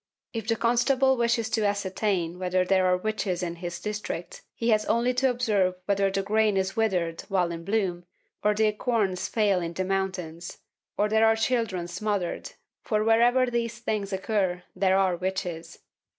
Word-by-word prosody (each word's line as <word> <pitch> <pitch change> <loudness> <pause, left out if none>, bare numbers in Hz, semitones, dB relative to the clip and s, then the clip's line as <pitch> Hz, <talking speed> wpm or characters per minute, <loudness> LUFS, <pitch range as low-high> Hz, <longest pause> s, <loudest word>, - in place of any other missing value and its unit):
If 225 -2 -4
the 230 - +2
constable 250 +3 +3
wishes 235 -2 +1
to 220 - +1
ascertain 190 -3 -1
whether 185 0 +1
there 185 0 +3
are 180 0 +3
witches 190 -3 -2
in 170 -1 -4
his 175 0 -5
district, 210 -5 -5
he 230 - -1
has 215 -1 +3
only 235 +2 +2
to 260 +1 +2
observe 210 -7 +1
whether 200 -1 +2
the 195 0 -1
grain 215 0 +2
is 190 0 -1
withered 180 -7 0
while 180 -3 +1
in 165 0 -6
bloom, 185 -3 -1 0.4
or 210 0 +3
the 220 +1 +3
acorns 210 -4 -1
fail 205 -5 +2
in 170 0 -4
the 185 +2 -2
mountains, 185 -3 -3 0.4
or 210 - +2
there 220 +1 +4
are 225 - +4
children 225 -6 -1
smothered, 205 - -3 0.3
for 215 -1 0
wherever 240 +3 +4
these 235 -2 -2
things 215 -3 -3
occur, 190 -2 -1
there 190 -1 +3
are 190 -2 +2
witches. 175 -2 -4
200 Hz, 170 wpm, -26 LUFS, 185-225 Hz, 0.4 s, there